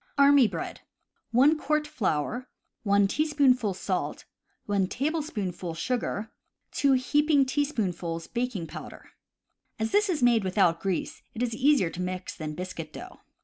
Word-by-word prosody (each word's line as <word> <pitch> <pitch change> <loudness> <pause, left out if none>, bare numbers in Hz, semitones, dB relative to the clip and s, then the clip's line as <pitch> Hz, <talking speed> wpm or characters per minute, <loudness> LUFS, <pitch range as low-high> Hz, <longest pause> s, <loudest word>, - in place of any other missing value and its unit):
drmy 280 -4 +6
Bread. - - -6 0.5
1 275 +7 +4
quart 305 0 0
flour, 245 - -2 0.3
1 200 -1 +3
teaspoonful 260 -6 +2
salt, 185 0 -3 0.4
1 200 -2 +1
tablespoonful 210 - -3
sugar, 220 +2 -2 0.4
2 280 -1 +3
heaping 285 +2 +3
teaspoonfuls 195 - -2
baking 240 -7 -3
powder. - - -10 0.7
As 220 0 -2
this 415 -1 +3
is 315 -8 0
made 235 -3 +4
without 185 -3 +2
grease, 190 -3 -2
it 235 - -1
is 235 -2 -1
easier 250 - +3
to 180 - -6
mix 185 0 -4
than 155 -2 -5
biscuit 170 -3 -6
dough. - - -10
225 Hz, 135 wpm, -27 LUFS, 185-280 Hz, 0.7 s, drmy